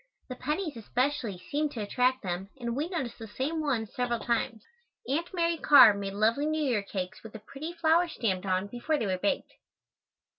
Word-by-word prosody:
The 255 Hz, -, -5 dB
pennies, 300 Hz, +5 st, -2 dB
especially, 240 Hz, -2 st, -1 dB
seemed 290 Hz, +10 st, -2 dB
to 230 Hz, -, -4 dB
attract 250 Hz, +5 st, +1 dB
them 185 Hz, +1 st, -3 dB
and 235 Hz, -2 st, -3 dB
we 300 Hz, +5 st, -2 dB
noticed 290 Hz, -10 st, -4 dB
the 225 Hz, -, -7 dB
same 275 Hz, +9 st, -2 dB
ones 240 Hz, -8 st, -1 dB
several 245 Hz, -1 st, 0 dB
times. 230 Hz, -1 st, -1 dB, 0.4 s
Aunt 325 Hz, +6 st, -1 dB
Mary 335 Hz, -2 st, +1 dB
Carr 265 Hz, -9 st, +8 dB
made 200 Hz, -1 st, -4 dB
lovely 225 Hz, +8 st, +2 dB
New 310 Hz, 0 st, 0 dB
Year 245 Hz, -7 st, +1 dB
cakes 190 Hz, -2 st, -5 dB
with 220 Hz, 0 st, -11 dB
a -, -, -6 dB
pretty 275 Hz, +9 st, -7 dB
flower 335 Hz, +1 st, +3 dB
stamped 200 Hz, -, -2 dB
on 185 Hz, +1 st, +1 dB
before 245 Hz, +9 st, -1 dB
they 225 Hz, -, -1 dB
were 185 Hz, -2 st, -1 dB
baked. 200 Hz, -, -1 dB
245 Hz, 190 wpm, -29 LUFS, 210-300 Hz, 0.4 s, Carr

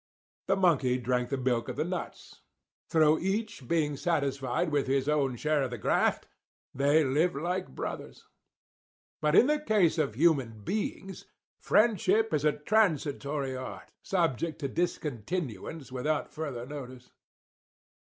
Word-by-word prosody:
The -, -, +3 dB
monkey 145 Hz, -10 st, +3 dB
drank 125 Hz, 0 st, -1 dB
the 135 Hz, -, -1 dB
milk 125 Hz, -2 st, 0 dB
of -, -, -4 dB
the -, -, 0 dB
nuts. -, -, -6 dB, 0.5 s
Through 155 Hz, -1 st, +4 dB
each 205 Hz, -, -3 dB
being 150 Hz, -1 st, +1 dB
satisfied 140 Hz, -3 st, -1 dB
with 145 Hz, -2 st, +1 dB
his 135 Hz, 0 st, +1 dB
own 140 Hz, -4 st, +1 dB
share 150 Hz, +4 st, +1 dB
of 130 Hz, -, -1 dB
the 120 Hz, -, -5 dB
graft, 105 Hz, -, +1 dB, 0.5 s
they 145 Hz, +4 st, +3 dB
lived 150 Hz, +6 st, +1 dB
like 175 Hz, -, -3 dB
brothers. -, -, -6 dB, 1.0 s
"But 150 Hz, +1 st, +2 dB
in -, -, +7 dB
the 300 Hz, +2 st, +2 dB
case 205 Hz, -, +2 dB
of 140 Hz, -8 st, 0 dB
human 130 Hz, -8 st, +2 dB
beings, 195 Hz, -, -4 dB, 0.3 s
friendship 220 Hz, -1 st, +3 dB
is 150 Hz, -2 st, +1 dB
a 150 Hz, -, +4 dB
transitory 150 Hz, -6 st, 0 dB
art, 130 Hz, 0 st, -8 dB
subject 165 Hz, -3 st, 0 dB
to 140 Hz, -, -1 dB
discontinuance 145 Hz, -, -3 dB
without 145 Hz, +4 st, -2 dB
further 140 Hz, -6 st, -5 dB
notice. 130 Hz, -3 st, -9 dB
150 Hz, 135 wpm, -29 LUFS, 130-170 Hz, 1.0 s, in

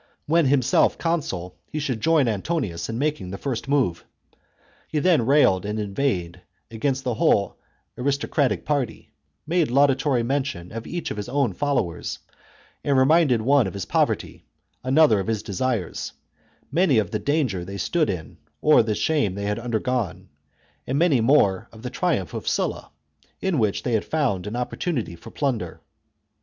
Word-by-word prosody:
When 165 Hz, -1 st, +3 dB
himself 130 Hz, -3 st, +3 dB
consul 95 Hz, -, -2 dB
he -, -, -4 dB
should 130 Hz, -7 st, -2 dB
join 155 Hz, -1 st, +3 dB
Antonius 105 Hz, -, -2 dB
in 115 Hz, -, -3 dB
making 145 Hz, -8 st, -1 dB
the 100 Hz, -, -5 dB
first 130 Hz, 0 st, -4 dB
move. 135 Hz, -12 st, +1 dB, 0.8 s
He -, -, -3 dB
then 150 Hz, -7 st, +3 dB
railed 135 Hz, -10 st, +4 dB
and 105 Hz, +1 st, -3 dB
inveighed 95 Hz, -5 st, -2 dB, 0.3 s
against 135 Hz, +4 st, -1 dB
the 125 Hz, -3 st, -1 dB
whole 100 Hz, -2 st, +2 dB, 0.4 s
aristo 140 Hz, +2 st, -1 dB
cratic 130 Hz, -, 0 dB
party; 140 Hz, -6 st, -2 dB, 0.3 s
made 165 Hz, -2 st, +1 dB
laudatory 135 Hz, -1 st, +3 dB
mention 130 Hz, -9 st, -2 dB
of 115 Hz, +1 st, -6 dB
each 175 Hz, -1 st, -4 dB
of -, -, -5 dB
his 105 Hz, +3 st, -5 dB
own 135 Hz, -5 st, +1 dB
followers; 135 Hz, -10 st, -1 dB, 0.7 s
and 140 Hz, -2 st, +2 dB
reminded 130 Hz, -4 st, +4 dB
one 135 Hz, -2 st, +4 dB
of 95 Hz, -, -6 dB
his 95 Hz, -3 st, -4 dB
poverty, -, -, -1 dB, 0.4 s
another 135 Hz, -4 st, +4 dB
of 95 Hz, -, -3 dB
his 110 Hz, -2 st, -1 dB
desires, 110 Hz, -1 st, -2 dB, 0.6 s
many 170 Hz, -7 st, +3 dB
of 105 Hz, -5 st, +1 dB
the 105 Hz, -, -1 dB
danger 120 Hz, -, 0 dB
they 100 Hz, +2 st, -7 dB
stood 155 Hz, -, +1 dB
in 80 Hz, -5 st, -5 dB, 0.2 s
or 150 Hz, -4 st, +6 dB
the 110 Hz, -2 st, -1 dB
shame 125 Hz, -12 st, +1 dB
they 100 Hz, 0 st, -4 dB
had 105 Hz, +2 st, -1 dB
undergone, 120 Hz, -2 st, -2 dB, 0.6 s
and 130 Hz, -, 0 dB
many 150 Hz, -7 st, +3 dB
more 110 Hz, -5 st, +3 dB
of 110 Hz, 0 st, -14 dB
the 125 Hz, -, -4 dB
triumph 125 Hz, -, -1 dB
of -, -, -6 dB
Sulla, -, -, -1 dB, 0.5 s
in 190 Hz, -7 st, 0 dB
which 105 Hz, -3 st, 0 dB
they 125 Hz, -, -1 dB
had 110 Hz, -, +2 dB
found 125 Hz, -, -1 dB
an 105 Hz, -, -4 dB
opportunity 125 Hz, -, -2 dB
for 85 Hz, -, -12 dB
plunder. 135 Hz, -6 st, -2 dB
125 Hz, 165 wpm, -24 LUFS, 105-145 Hz, 0.8 s, or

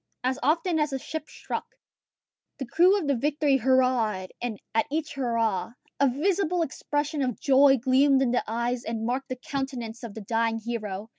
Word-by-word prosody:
As 260 Hz, +2 st, 0 dB
often 325 Hz, +4 st, +1 dB
as 300 Hz, -1 st, +1 dB
a -, -, 0 dB
ship 310 Hz, +3 st, -6 dB
struck, -, -, -6 dB, 0.8 s
the 270 Hz, -, -4 dB
crew 360 Hz, -, +4 dB
of 375 Hz, -, -2 dB
the 285 Hz, -, +2 dB
Victory 290 Hz, +2 st, +2 dB
hurrahed; 240 Hz, -7 st, +2 dB
and 240 Hz, -4 st, -3 dB
at 225 Hz, 0 st, +2 dB
each 310 Hz, +1 st, -2 dB
hurrah, 230 Hz, -6 st, -1 dB, 0.3 s
a 280 Hz, -1 st, +4 dB
visible 355 Hz, +5 st, +1 dB
expression 290 Hz, 0 st, -2 dB
of 250 Hz, -6 st, -1 dB
joy 270 Hz, 0 st, +5 dB
gleamed 265 Hz, +2 st, +4 dB
in 245 Hz, -, +1 dB
the 245 Hz, -, +1 dB
eyes 235 Hz, +2 st, -1 dB
and 225 Hz, -1 st, -3 dB
marked 260 Hz, +3 st, -2 dB
the 255 Hz, -, -2 dB
countenance 255 Hz, -4 st, -5 dB
of 230 Hz, -5 st, -8 dB
the 220 Hz, -, -6 dB
dying 225 Hz, +2 st, 0 dB
hero. 215 Hz, -3 st, -5 dB
260 Hz, 175 wpm, -26 LUFS, 230-290 Hz, 0.8 s, joy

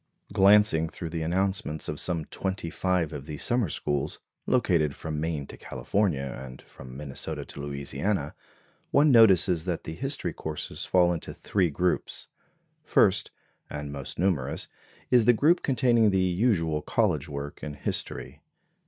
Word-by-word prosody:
Glancing 100 Hz, -5 st, +5 dB
through 85 Hz, 0 st, -7 dB
the 85 Hz, -1 st, -3 dB
announcements 95 Hz, -1 st, -1 dB
of 75 Hz, -, -2 dB
some 85 Hz, -4 st, -2 dB
twenty 95 Hz, -2 st, -4 dB
five 90 Hz, -4 st, 0 dB
of 70 Hz, 0 st, -7 dB
these 75 Hz, -2 st, -5 dB
summer 120 Hz, -7 st, +1 dB
schools, 75 Hz, -1 st, -2 dB, 0.3 s
located 85 Hz, -, +2 dB
from 80 Hz, -2 st, -4 dB
Maine 80 Hz, -3 st, -2 dB
to -, -, -11 dB
California 70 Hz, -11 st, -2 dB
and 65 Hz, 0 st, -10 dB
from 65 Hz, 0 st, -12 dB
Minnesota 70 Hz, -2 st, -5 dB
to -, -, -8 dB
Louisiana, 70 Hz, +4 st, -2 dB, 0.6 s
one 145 Hz, +1 st, +5 dB
notices 95 Hz, -7 st, +5 dB
that 90 Hz, -3 st, -2 dB
the 80 Hz, -, -6 dB
history 135 Hz, -, -3 dB
courses 75 Hz, 0 st, -5 dB
fall 90 Hz, -1 st, +4 dB
into 80 Hz, -, -6 dB
three 95 Hz, -4 st, 0 dB
groups. 90 Hz, +4 st, -1 dB, 0.6 s
First, -, -, +3 dB, 0.4 s
and 75 Hz, -1 st, -5 dB
most 70 Hz, -2 st, -7 dB
numerous 85 Hz, -7 st, -1 dB, 0.4 s
is 120 Hz, -3 st, +5 dB
the 120 Hz, -, +7 dB
group 155 Hz, +9 st, +3 dB
containing 120 Hz, -4 st, +3 dB
the 95 Hz, -, +1 dB
usual 90 Hz, -4 st, +1 dB
college 80 Hz, -, 0 dB
work 70 Hz, 0 st, -6 dB
in 75 Hz, -1 st, -6 dB
history. -, -, -4 dB
85 Hz, 145 wpm, -27 LUFS, 75-100 Hz, 0.6 s, the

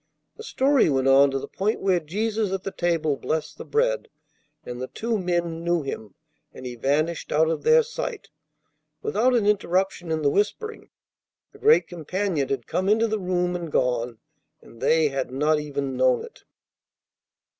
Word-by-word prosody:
The -, -, -11 dB
story 275 Hz, -, +2 dB
went 135 Hz, -2 st, +1 dB
on 135 Hz, +1 st, +6 dB
to 135 Hz, -, -2 dB
the -, -, -5 dB
point 210 Hz, +3 st, -1 dB
where 190 Hz, -2 st, +2 dB
Jesus 210 Hz, +5 st, -2 dB
at 190 Hz, 0 st, -3 dB
the 195 Hz, -, -4 dB
table 165 Hz, -6 st, 0 dB
blessed 155 Hz, +2 st, -3 dB
the -, -, -5 dB
bread, -, -, 0 dB, 0.6 s
and 125 Hz, 0 st, -6 dB
the 130 Hz, -, -3 dB
two 225 Hz, -, -2 dB
men 175 Hz, -2 st, -1 dB
knew 170 Hz, -2 st, +1 dB
Him, 110 Hz, -7 st, -6 dB, 0.4 s
and 130 Hz, -, -11 dB
He 125 Hz, -, -5 dB
vanished 145 Hz, +7 st, -1 dB
out 160 Hz, +2 st, +3 dB
of -, -, -2 dB
their 470 Hz, +1 st, +5 dB
sight, 460 Hz, -1 st, -5 dB, 0.7 s
without 255 Hz, -, +2 dB
an 225 Hz, -4 st, +2 dB
interruption 190 Hz, -3 st, 0 dB
in 160 Hz, -1 st, -1 dB
the 140 Hz, -, +3 dB
whispering. 425 Hz, -, -2 dB, 0.6 s
The -, -, -17 dB
Great 450 Hz, +2 st, +5 dB
Companion 175 Hz, -2 st, -2 dB
had 130 Hz, -4 st, -2 dB
come 185 Hz, +2 st, -1 dB
into 225 Hz, +2 st, +3 dB
the 220 Hz, -1 st, -1 dB
room 180 Hz, -1 st, 0 dB
and 170 Hz, -3 st, -5 dB
gone, 120 Hz, -3 st, 0 dB, 0.4 s
and 115 Hz, -, -17 dB
they 160 Hz, -2 st, +3 dB
had 135 Hz, -2 st, -3 dB
not 150 Hz, +4 st, +1 dB
even 140 Hz, -3 st, -3 dB
known 130 Hz, -1 st, +2 dB
it. -, -, -17 dB
170 Hz, 175 wpm, -24 LUFS, 140-210 Hz, 0.7 s, on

